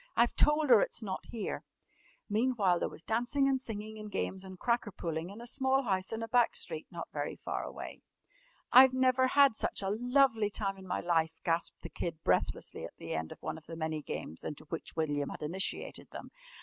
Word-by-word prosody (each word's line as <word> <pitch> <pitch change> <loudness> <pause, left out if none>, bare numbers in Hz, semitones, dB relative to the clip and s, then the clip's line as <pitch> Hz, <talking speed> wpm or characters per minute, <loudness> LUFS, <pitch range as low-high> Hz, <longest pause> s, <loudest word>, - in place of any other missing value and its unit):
I've 235 - +4
told 300 -2 +4
her 225 -4 +9
it's 230 - -1
not 190 -3 -4
here!" 225 -3 -4 0.6
Meantime 210 -5 +2
there - - -1
was 165 - -10
dancing, 245 +5 +1
and 265 -1 +1
singing, 215 -2 -5
and 210 -1 -8
games, 190 0 -2
and 190 -1 -9
cracker 235 0 0
pulling 165 -1 -4
in 205 +3 -9
a 235 - -8
small 265 +2 +2
house 190 -5 0
in 225 0 -3
a - - -3
back 240 0 +3
street 475 - -3
not - - -7
very - - -3
far - - -4
away. - - -7 0.7
"I've 255 +1 +9
never 260 0 +4
had 275 -2 +5
such 205 - 0
a 195 - 0
lovely 245 -1 +3
time 195 -2 -2
in 190 - -11
my - - -1
life," 165 -2 +1
gasped 170 +1 -1
the - - -6
Kid 165 -2 -5
breathlessly - - 0
at - - -8
the - - -5
end 80 0 -3
of - - -11
one 155 - -3
of 155 - -17
the 165 - -6
many 160 -1 -2
games 80 - -5
into 150 - -5
which 165 - -5
William 145 -3 0
had - - -7
initiated 180 +5 -2
them. - - -9
210 Hz, 210 wpm, -32 LUFS, 170-245 Hz, 0.7 s, her